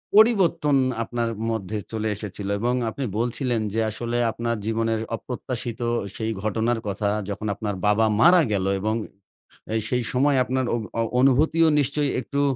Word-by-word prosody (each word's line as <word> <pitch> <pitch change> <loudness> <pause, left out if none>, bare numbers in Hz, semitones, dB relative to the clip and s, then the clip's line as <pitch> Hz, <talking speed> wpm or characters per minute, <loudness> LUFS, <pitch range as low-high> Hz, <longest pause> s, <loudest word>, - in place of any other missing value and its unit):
পরিবর্তন 185 -9 +4 0.3
আপনার 120 0 -2 0.2
মধ্যে 110 -1 -3
চলে 110 -1 -2
এসেছিল 100 -1 -6
এবং 120 +3 +1 0.2
আপনি 135 +4 -4
বলছিলেন, 120 0 0
যে, 115 - 0
আসলে 120 +2 -3
আপনার 115 +1 -2
জীবনের 115 0 0 0.2
অপ্রত্যাশিত 120 0 -5 0.3
সেই 110 0 -2
ঘটনার 115 +2 0
কথা 100 +1 -1 0.2
যখন 100 +1 -4
আপনার 105 0 -3
বাবা 105 +2 +4 0.2
মারা 175 +1 +7
গেল 95 -2 0
এবং 110 +3 0 0.8
আ - - -1 0.2
সেই 125 -1 0
সময় 140 +2 +3
আপনার 130 +1 -1
অ - - 0 0.4
অনুভূতিও 155 +5 +4
নিশ্চয়ই 145 0 +1
একটু 140 +4 -2
120 Hz, 145 wpm, -24 LUFS, 110-135 Hz, 0.8 s, মারা